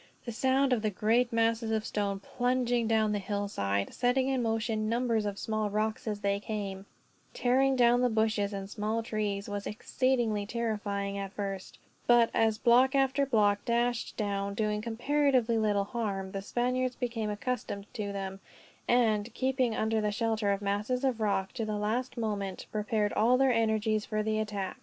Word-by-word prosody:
The 235 Hz, -, -4 dB
sound 265 Hz, +3 st, +2 dB
of 235 Hz, -, +1 dB
the 215 Hz, -, +1 dB
great 225 Hz, +5 st, +1 dB
masses 230 Hz, 0 st, +1 dB
of 220 Hz, -1 st, 0 dB
stone, 200 Hz, -2 st, -2 dB
plunging 245 Hz, 0 st, 0 dB
down 220 Hz, -1 st, +2 dB
the 205 Hz, -, 0 dB
hillside, 190 Hz, -, -2 dB
setting 255 Hz, +2 st, +1 dB
in 265 Hz, -2 st, +1 dB
motion 225 Hz, -1 st, -1 dB
numbers 230 Hz, -2 st, +1 dB
of 200 Hz, -1 st, -4 dB
small 215 Hz, -1 st, -1 dB
rocks 215 Hz, +2 st, -2 dB
as 210 Hz, -1 st, -2 dB
they 200 Hz, 0 st, +1 dB
came, 200 Hz, -2 st, -5 dB, 0.5 s
tearing 265 Hz, +2 st, +3 dB
down 245 Hz, -1 st, +4 dB
the 250 Hz, -, +3 dB
bushes 220 Hz, -2 st, +1 dB
and 195 Hz, -1 st, -5 dB
small 215 Hz, +2 st, -2 dB
trees, 210 Hz, -3 st, -2 dB
was 205 Hz, 0 st, -4 dB
exceedingly 225 Hz, -2 st, 0 dB
terrifying 205 Hz, -3 st, -2 dB
at 195 Hz, 0 st, -5 dB
first; 195 Hz, -2 st, -5 dB, 0.3 s
but 240 Hz, -1 st, +5 dB
as 220 Hz, -1 st, +2 dB
block 250 Hz, +4 st, +4 dB
after 275 Hz, +1 st, +2 dB
block 205 Hz, -5 st, +2 dB
dashed 240 Hz, 0 st, 0 dB
down, 200 Hz, -1 st, -2 dB
doing 210 Hz, -1 st, 0 dB
comparatively 245 Hz, 0 st, +1 dB
little 205 Hz, -2 st, +2 dB
harm, 200 Hz, -3 st, -3 dB
the 195 Hz, -, -4 dB
Spaniards 250 Hz, +4 st, -1 dB
became 230 Hz, -3 st, -2 dB
accustomed 210 Hz, -2 st, -3 dB
to 205 Hz, -2 st, -3 dB
them; 195 Hz, -1 st, -5 dB, 0.5 s
and, 225 Hz, -2 st, +2 dB
keeping 255 Hz, -3 st, +1 dB
under 220 Hz, 0 st, +1 dB
the 210 Hz, 0 st, 0 dB
shelter 220 Hz, -1 st, 0 dB
of 200 Hz, +1 st, -2 dB
masses 210 Hz, +6 st, -1 dB
of 255 Hz, -4 st, 0 dB
rock, 195 Hz, -2 st, 0 dB
to 235 Hz, -, -3 dB
the 215 Hz, -1 st, -2 dB
last 230 Hz, +5 st, -2 dB
moment, 205 Hz, -4 st, -3 dB
prepared 210 Hz, 0 st, 0 dB
all 235 Hz, +4 st, +4 dB
their 265 Hz, -1 st, +4 dB
energies 220 Hz, -1 st, +1 dB
for 215 Hz, 0 st, -2 dB
the 215 Hz, 0 st, 0 dB
attack. 205 Hz, -3 st, -3 dB
220 Hz, 170 wpm, -30 LUFS, 205-240 Hz, 0.5 s, but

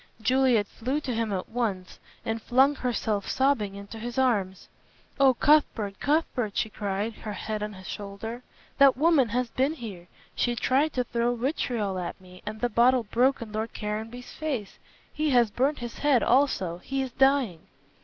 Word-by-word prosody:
Juliet 245 Hz, -1 st, +3 dB
flew 255 Hz, +8 st, -3 dB
to 260 Hz, -4 st, -3 dB
him 225 Hz, -1 st, -1 dB
at 185 Hz, -2 st, -3 dB
once 215 Hz, -6 st, -3 dB, 0.3 s
and 225 Hz, 0 st, -2 dB
flung 265 Hz, +5 st, +4 dB
herself 225 Hz, -6 st, -2 dB
sobbing 260 Hz, -7 st, +1 dB
into 200 Hz, +3 st, -9 dB
his 240 Hz, +3 st, -6 dB
arms. 205 Hz, -8 st, 0 dB, 0.5 s
"Oh, 270 Hz, -2 st, +6 dB
Cuthbert 230 Hz, -9 st, +2 dB
Cuthbert!" 265 Hz, -8 st, 0 dB
she 220 Hz, -, 0 dB
cried, 205 Hz, +2 st, -2 dB
her 215 Hz, -, -6 dB
head 215 Hz, +1 st, -4 dB
on 210 Hz, 0 st, -4 dB
his 185 Hz, -1 st, -12 dB
shoulder, 210 Hz, +4 st, -6 dB, 0.4 s
"that 275 Hz, -2 st, +7 dB
woman 295 Hz, -5 st, +4 dB
has 245 Hz, +2 st, -1 dB
been 270 Hz, +4 st, +1 dB
here. 205 Hz, -, -8 dB, 0.3 s
She 240 Hz, -1 st, 0 dB
tried 275 Hz, +6 st, +1 dB
to 250 Hz, -, 0 dB
throw 240 Hz, 0 st, 0 dB
vitriol 230 Hz, -, -1 dB
at 175 Hz, +1 st, -5 dB
me, 185 Hz, -1 st, -15 dB
and 215 Hz, 0 st, -5 dB
the 245 Hz, -, +2 dB
bottle 240 Hz, +2 st, +4 dB
broke 245 Hz, +4 st, +1 dB
on 220 Hz, -, -11 dB
Lord 220 Hz, +1 st, -4 dB
Caranby's 220 Hz, +4 st, -5 dB
face. 270 Hz, -11 st, -4 dB, 0.3 s
He 305 Hz, 0 st, 0 dB
has 240 Hz, -5 st, +4 dB
burnt 275 Hz, +6 st, +1 dB
his 240 Hz, -1 st, -7 dB
head 285 Hz, -4 st, +3 dB
also; 215 Hz, -10 st, +2 dB
he 270 Hz, +7 st, -2 dB
is 260 Hz, -, -5 dB
dying." 265 Hz, -, +2 dB
235 Hz, 175 wpm, -27 LUFS, 210-265 Hz, 0.5 s, that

